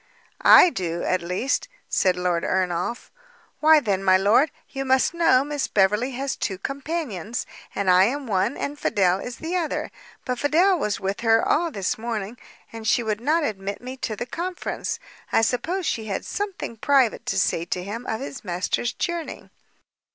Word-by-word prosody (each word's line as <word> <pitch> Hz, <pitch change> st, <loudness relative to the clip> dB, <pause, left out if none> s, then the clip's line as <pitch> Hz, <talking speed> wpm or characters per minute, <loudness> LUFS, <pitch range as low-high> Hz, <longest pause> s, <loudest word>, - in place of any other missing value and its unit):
"I 360 Hz, -, +8 dB
do, 170 Hz, -, -3 dB
at 185 Hz, -, +1 dB
least," 180 Hz, -, -1 dB, 0.2 s
said 185 Hz, -1 st, +2 dB
Lord 180 Hz, -2 st, 0 dB
Ernolf. 185 Hz, +5 st, -1 dB, 0.5 s
"Why 310 Hz, 0 st, +7 dB
then, 200 Hz, -8 st, -1 dB
my 185 Hz, -1 st, +5 dB
lord, 215 Hz, +10 st, +4 dB, 0.2 s
you 270 Hz, -1 st, -4 dB
must 265 Hz, +3 st, +2 dB
know, 330 Hz, -6 st, +4 dB
Miss 290 Hz, -1 st, -2 dB
Beverley 210 Hz, +6 st, +2 dB
has 265 Hz, 0 st, -2 dB
two 190 Hz, -, -3 dB
companions, 275 Hz, -, -4 dB, 0.3 s
and 200 Hz, -, -2 dB
I 185 Hz, +1 st, +6 dB
am 275 Hz, +5 st, -2 dB
one, 195 Hz, +2 st, 0 dB
and 290 Hz, +1 st, -4 dB
Fidel 185 Hz, -2 st, +2 dB
is 245 Hz, +3 st, -6 dB
the 325 Hz, +5 st, -4 dB
other; 335 Hz, -4 st, -2 dB, 0.3 s
but 250 Hz, -1 st, -2 dB
Fidel 345 Hz, +5 st, +3 dB
was 210 Hz, -6 st, -1 dB
with 195 Hz, +2 st, -3 dB
her 225 Hz, -1 st, +3 dB
all 340 Hz, +1 st, +2 dB
this 200 Hz, -, -2 dB
morning, 225 Hz, -1 st, -4 dB, 0.3 s
and 225 Hz, -1 st, -6 dB
she 240 Hz, -, +3 dB
would 215 Hz, -1 st, -2 dB
not 310 Hz, +6 st, +2 dB
admit 200 Hz, -5 st, -3 dB
me 255 Hz, +1 st, -7 dB
to 220 Hz, -4 st, -3 dB
the 240 Hz, -, -4 dB
conference. 350 Hz, +7 st, -4 dB, 0.3 s
I -, -, +3 dB
suppose 335 Hz, -, -1 dB
she 220 Hz, -7 st, -1 dB
had 200 Hz, -3 st, -3 dB
something 395 Hz, -, -4 dB
private 265 Hz, -1 st, +2 dB
to 195 Hz, -, -1 dB
say 170 Hz, -3 st, +1 dB
to 180 Hz, +1 st, -3 dB
him 225 Hz, +6 st, -6 dB
of 220 Hz, -, -2 dB
his 140 Hz, 0 st, -7 dB
master's 185 Hz, +5 st, -1 dB
journey." 345 Hz, -2 st, -4 dB
230 Hz, 175 wpm, -24 LUFS, 195-285 Hz, 0.5 s, I